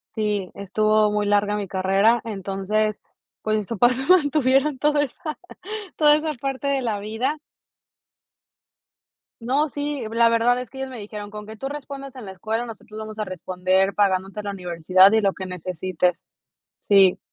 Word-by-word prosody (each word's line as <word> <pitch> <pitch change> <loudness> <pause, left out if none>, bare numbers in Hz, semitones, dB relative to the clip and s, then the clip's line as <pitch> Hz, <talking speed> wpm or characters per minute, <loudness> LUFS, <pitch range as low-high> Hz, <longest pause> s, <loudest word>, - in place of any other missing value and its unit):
sí, 210 -4 -1
estuvo 215 +2 +2
muy 210 0 0
larga 205 0 +2
mi 205 -1 -3
carrera, 195 +5 +2
entonces, 205 0 -2 0.4
pues 215 0 0
mis 210 -3 -3
papás 240 +2 +3
me 265 - -3
mantuvieron 290 -5 +3
toda 295 +2 +2
esa 295 +2 -5 0.6
toda 295 -1 +6
esa 305 0 -1
parte 270 +1 -4
de 275 -1 +1
la 220 -4 -2
vida. 225 +8 -2 2.0
No, 270 +6 +1
sí, 290 -1 -3
la 230 +1 +4
verdad 235 +2 +2
es 250 - -7
que 265 - -12
ellos 265 0 -4
me 250 - -8
dijeron: 205 -1 -7
"Con 210 0 -8
que 220 +1 -9
tú 270 +5 -4
respondas 275 -1 -7
en 250 - -8
la 190 - -7
escuela, 220 +5 -3
nosotros 215 -1 -10
vamos 215 0 -7
a - - 0
responder 185 +1 0
pagándote 195 0 0
la 205 - -4
universidad 185 +1 +4
y 220 - +4
lo 200 -2 +2
que 190 - -7
necesites". 180 0 -2 0.6
Sí. 195 -3 +5
215 Hz, 165 wpm, -23 LUFS, 195-260 Hz, 2.0 s, toda